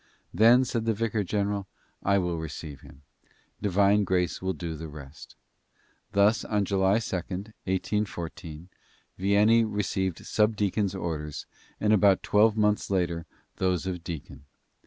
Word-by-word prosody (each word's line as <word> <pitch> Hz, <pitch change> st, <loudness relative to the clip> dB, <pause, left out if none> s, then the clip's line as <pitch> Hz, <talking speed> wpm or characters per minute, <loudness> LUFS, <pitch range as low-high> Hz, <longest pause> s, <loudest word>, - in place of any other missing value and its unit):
"Then," 120 Hz, +4 st, +6 dB
said 115 Hz, -2 st, -2 dB
the 115 Hz, -1 st, +1 dB
vicar 110 Hz, -1 st, -1 dB
general, 100 Hz, 0 st, -1 dB, 0.3 s
"I 100 Hz, 0 st, +2 dB
will 90 Hz, -3 st, -1 dB
receive 80 Hz, -2 st, -7 dB
him. 70 Hz, +1 st, -16 dB, 0.6 s
Divine 100 Hz, +1 st, +3 dB
grace 90 Hz, -3 st, 0 dB
will 95 Hz, 0 st, -1 dB
do 85 Hz, -3 st, -5 dB
the 80 Hz, +1 st, -7 dB
rest." 75 Hz, -2 st, -12 dB, 0.8 s
Thus, 100 Hz, +3 st, +3 dB
on 105 Hz, -2 st, 0 dB
July 95 Hz, +1 st, +2 dB
2d, 100 Hz, -1 st, -4 dB
1814, 90 Hz, -4 st, -3 dB, 0.5 s
Vianney 105 Hz, +4 st, +4 dB
received 100 Hz, -4 st, -2 dB
subdeacon's 105 Hz, -2 st, +1 dB
orders 75 Hz, -5 st, -4 dB, 0.3 s
and 105 Hz, 0 st, +3 dB
about 100 Hz, -2 st, +4 dB
twelve 110 Hz, +1 st, +3 dB
month's 105 Hz, -1 st, +1 dB
later 85 Hz, -3 st, -1 dB, 0.3 s
those 90 Hz, -1 st, 0 dB
of 90 Hz, -3 st, -4 dB
deacon. 80 Hz, -4 st, -8 dB
95 Hz, 130 wpm, -27 LUFS, 85-105 Hz, 0.8 s, Then